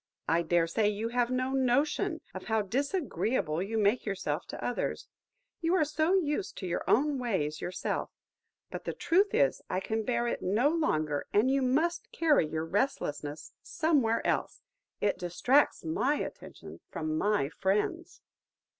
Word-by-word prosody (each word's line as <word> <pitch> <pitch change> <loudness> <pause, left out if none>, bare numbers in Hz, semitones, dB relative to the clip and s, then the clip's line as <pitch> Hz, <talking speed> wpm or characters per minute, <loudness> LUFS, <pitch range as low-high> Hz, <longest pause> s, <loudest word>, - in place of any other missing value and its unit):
I 165 +1 +3
dare 170 0 +2
say 205 +6 +1
you 210 +2 -2
have 240 0 +1
no 255 +1 0
notion 285 +7 +1
of 185 - -7
how 220 -1 +1
disagreeable 255 - -1
you 215 +4 -2
make 210 +3 +2
yourself 190 -6 -3
to - - -6
others; 245 - -2 0.5
you 335 +2 +1
are 315 - +3
so 315 +4 +1
used 350 +1 -1
to 190 - -5
your 175 -1 -2
own 285 +2 +3
ways, 155 -11 -1
yourself. 180 0 -3 0.6
But - - -6
the - - -2
truth 385 +5 +2
is, 135 -1 +2
I - - 0
can 220 +3 -2
bear 235 +1 0
it - - -2
no 220 +10 +2
longer, 155 - 0
and 225 +6 +4
you 275 0 +2
must 305 +7 0
carry 300 - +3
your 160 +1 -3
restlessness 155 - -2
somewhere 280 -9 +1
else–it 355 - -3
distracts 215 - +2
my 255 - +1
attention - - -7
from 155 -1 -3
my 160 -6 +1
friends!" 210 - -1
230 Hz, 155 wpm, -30 LUFS, 180-290 Hz, 0.6 s, and